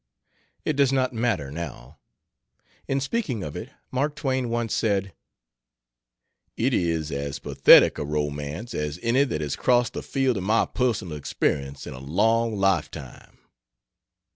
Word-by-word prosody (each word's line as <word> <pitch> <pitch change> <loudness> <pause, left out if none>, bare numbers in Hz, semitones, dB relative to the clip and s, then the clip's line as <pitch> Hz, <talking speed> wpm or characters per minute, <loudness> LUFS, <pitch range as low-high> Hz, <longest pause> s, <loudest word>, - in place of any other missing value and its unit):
It 155 - +1
does 140 -2 +3
not 130 -1 +1
matter, 110 - -1
now. 75 -3 -7 0.9
In 135 - +1
speaking 135 - -2
of 75 - -6
it, - - -6 0.2
Mark 145 +3 0
Twain 130 -5 -1
once 115 -1 -1
said: 100 -4 0 1.4
"It 130 +3 +1
is 80 -5 0
as 70 +1 -3
pathetic - - +6
a - - -1
romance 75 - -3
as 75 +1 -3
any 125 +4 +3
that 80 - -3
has 75 -2 -2
crossed 120 -2 +2
the - - -4
field 135 -4 0
of 95 - -3
my 110 +4 +3
personal 110 -10 -1
experience 70 -1 -2
in - - -7
a 65 - -9
long 110 - +1
lifetime." 80 -8 -2
100 Hz, 140 wpm, -25 LUFS, 75-125 Hz, 1.4 s, pathetic